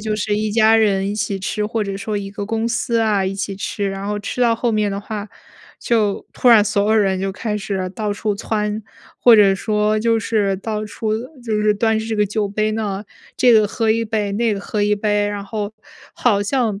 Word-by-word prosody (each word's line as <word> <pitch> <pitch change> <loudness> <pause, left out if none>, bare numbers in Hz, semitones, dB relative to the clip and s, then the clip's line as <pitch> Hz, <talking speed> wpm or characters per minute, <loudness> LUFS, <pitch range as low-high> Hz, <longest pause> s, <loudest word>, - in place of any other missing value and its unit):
就 215 0 -2
是 210 0 -1
一 215 0 -1
家 220 +1 +4
人 200 -3 +2
一 205 - -2
起 205 -2 -2
吃， 210 +2 -2
或 215 0 -1
者 195 -1 -4
说 205 +2 -3
一 195 - -5
个 200 0 -5
公 225 +2 -1
司 235 0 0
啊， 210 -4 +2
一 190 - -1
起 195 0 -4
吃， 200 +1 -3
然 195 0 -5
后 210 0 -1
吃 205 +4 -5
到 235 -2 +3
后 235 -1 0
面 210 -1 +1
的 200 0 -3
话， 210 0 -6 0.5
就 215 -4 0
突 250 - +2
然 220 -3 +7
所 205 -1 +1
有 220 - +4
人 190 -2 +1
就 195 0 -1
开 210 +2 -3
始 195 -2 -3
到 210 -2 -2
处 205 0 -2
蹿， 210 0 -2 0.4
或 235 -2 +7
者 195 -2 +5
说 210 +1 0
就 230 0 +2
是 200 -3 0
到 215 +1 -4
处 215 +1 -3 0.3
就 220 -2 -1
是 210 0 +3
端 220 +1 +1
着 220 - -2
这 225 - -2
个 210 0 +2
酒 210 0 -1
杯 215 +1 -1
呢， 210 -2 -3 0.3
这 245 -1 +5
个 215 -2 +5
喝 225 0 -1
1 230 0 -1
杯， 210 -2 -2
那 230 +2 +1
个 200 - -2
喝 205 +1 -2
1 210 0 +2
杯。 205 0 +1
然 205 -1 -4
后 210 0 -4 0.4
好 205 -5 +1
像 215 -2 0
210 Hz, 240 characters per minute, -19 LUFS, 200-220 Hz, 0.5 s, 然